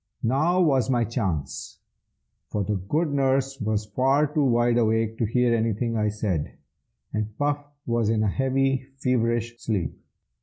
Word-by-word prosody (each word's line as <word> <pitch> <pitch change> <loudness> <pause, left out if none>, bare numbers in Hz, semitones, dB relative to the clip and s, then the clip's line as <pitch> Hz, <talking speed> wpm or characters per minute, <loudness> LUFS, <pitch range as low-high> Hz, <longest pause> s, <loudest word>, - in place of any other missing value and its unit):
Now 155 +10 +2
was 135 -9 +3
my 120 -2 +2
chance, 95 - -3 0.7
for 105 - -2
the 105 - -1
good 145 - -1
nurse 135 -1 +1
was 105 0 0
far 135 +7 +2
too 150 0 0
wide 120 -2 +3
awake 110 0 +1
to 115 - +2
hear 120 +1 +2
anything 115 +1 0
I 105 -1 +1
said, 105 -7 -2 0.6
and 105 0 -3
Puff 145 0 0 0.2
was 115 -2 +1
in 110 -1 +2
a - - +2
heavy, 135 +3 +1
feverish 120 -3 0
sleep. 100 -7 -1
120 Hz, 150 wpm, -25 LUFS, 110-135 Hz, 0.7 s, was